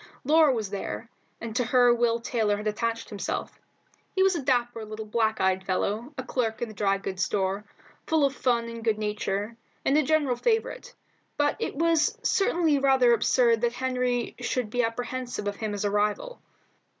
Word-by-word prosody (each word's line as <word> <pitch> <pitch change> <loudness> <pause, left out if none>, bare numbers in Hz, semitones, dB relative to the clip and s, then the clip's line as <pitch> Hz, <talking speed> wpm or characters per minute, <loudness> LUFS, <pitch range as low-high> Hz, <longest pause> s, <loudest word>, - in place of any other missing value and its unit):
Laura 305 +1 +5
was 220 -6 -2
there, 205 +3 -5 0.3
and 225 -1 -6
to 250 - +2
her 245 0 +4
Will 235 -1 +1
Taylor 220 -3 0
had 210 - -7
attached 230 +2 -2
himself. 205 -2 -4 0.6
He 380 - +4
was 385 -1 +3
a 330 - -2
dapper 240 -3 0
little 215 0 -7
black 220 0 0
eyed 190 0 +1
fellow, 205 +7 -2
a 260 - -3
clerk 235 -3 -2
in 240 - -2
the - - -9
dry 195 -1 +1
goods 190 -2 -3
store, 195 +1 -1 0.4
full 315 -3 +3
of 275 - 0
fun 240 -2 +1
and 230 0 -7
good 220 -2 +1
nature, 210 0 -2 0.3
and 270 - +3
a 305 - +5
general 290 -4 +1
favourite, - - -1 0.4
but 290 0 +2
it - - -3
was 335 +7 +2
certainly 340 -9 +2
rather 265 -3 +4
absurd 235 0 +3
that 240 -1 +1
Henry 250 -1 -1
should 245 -2 -2
be 245 - +1
apprehensive 245 -1 -3
of 205 0 -3
him 215 -2 -3
as 205 - -3
a 205 - +1
rival. 210 - -1
235 Hz, 185 wpm, -27 LUFS, 215-265 Hz, 0.6 s, Laura